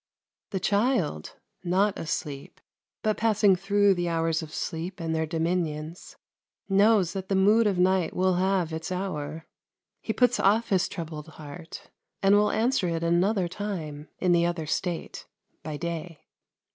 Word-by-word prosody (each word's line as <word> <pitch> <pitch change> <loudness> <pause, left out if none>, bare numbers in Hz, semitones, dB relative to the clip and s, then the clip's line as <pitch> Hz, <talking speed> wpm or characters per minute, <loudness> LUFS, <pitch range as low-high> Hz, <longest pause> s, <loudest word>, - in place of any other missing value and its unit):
The 195 - -2
child, 200 - 0 0.3
not 190 +3 +1
asleep, 150 -4 -5 0.4
but 215 -1 +1
passing 210 -3 +4
through 200 +2 +3
the 175 -1 -1
hours 165 -1 0
of 155 -1 -8
sleep 170 +4 -4
and 165 -1 -2
their 160 0 0
dominions, 165 -1 -3 0.5
knows 200 -2 +4
that 190 -1 -5
the 195 - +1
mood 210 +4 +4
of 195 -3 0
night 185 -1 +2
will 185 0 +2
have 185 -3 +1
its 160 +3 -5
hour; 160 -4 -4 0.6
he - - -2
puts 245 +2 +2
off 215 +4 +3
his 190 -3 +2
troubled 155 -2 -7
heart, 160 +2 -10 0.3
and 195 +1 +5
will 210 0 +4
answer 235 -3 +1
it 165 0 -2
another 180 +3 +2
time, 165 -6 -5
in 180 - +1
the 170 -1 +4
other 170 -2 -1
state, 170 +2 -3 0.3
by 150 -1 -5
day. 170 -1 -5
180 Hz, 150 wpm, -27 LUFS, 160-200 Hz, 0.6 s, and